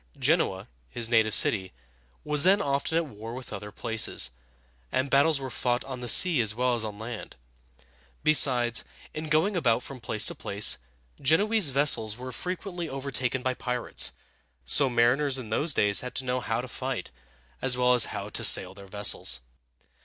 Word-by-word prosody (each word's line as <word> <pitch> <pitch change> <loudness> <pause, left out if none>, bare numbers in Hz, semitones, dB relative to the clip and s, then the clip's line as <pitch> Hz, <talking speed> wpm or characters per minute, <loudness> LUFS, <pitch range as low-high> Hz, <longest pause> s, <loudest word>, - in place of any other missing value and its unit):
Genoa, - - 0 0.2
his 115 - -1
native 110 -2 +2
city, 95 -4 +2 0.5
was 150 -1 0
then 190 +3 +4
often 140 +3 -2
at 165 - 0
war 115 -3 -10
with 130 -1 -10
other 105 +1 -8
places, 110 - -1 0.6
and 135 +1 -2
battles 140 +2 +3
were 135 -2 -7
fought 120 +1 -2
on 130 -2 -8
the 120 - -6
sea 165 +1 +5
as 110 -2 +1
well 125 +1 0
as 120 -2 0
on 105 -2 -7
land. 115 +1 -8 0.9
Besides, 125 -6 +4 0.3
in 155 0 -6
going 160 +7 +1
about 125 -8 0
from 135 -2 -9
place 110 -2 +2
to - - +3
place, 100 +1 0 0.4
Genoese 195 +5 +3
vessels 125 -6 +1
were 130 +1 -8
frequently 180 - -6
overtaken 130 -2 -2
by 130 - -1
pirates; 125 -1 -2 0.5
so 135 - +4
mariners 130 +4 +2
in 115 -4 -8
those 150 +8 +1
days 100 -6 +4
had 125 - -8
to 130 - -3
know 125 0 -2
how - - -3
to - - -9
fight, - - -6 0.5
as 125 -1 +2
well 125 0 +3
as 120 -3 +5
how - - -6
to - - -1
sail - - +5
their 100 0 -14
vessels. 100 -9 +1
125 Hz, 175 wpm, -26 LUFS, 115-145 Hz, 0.9 s, sea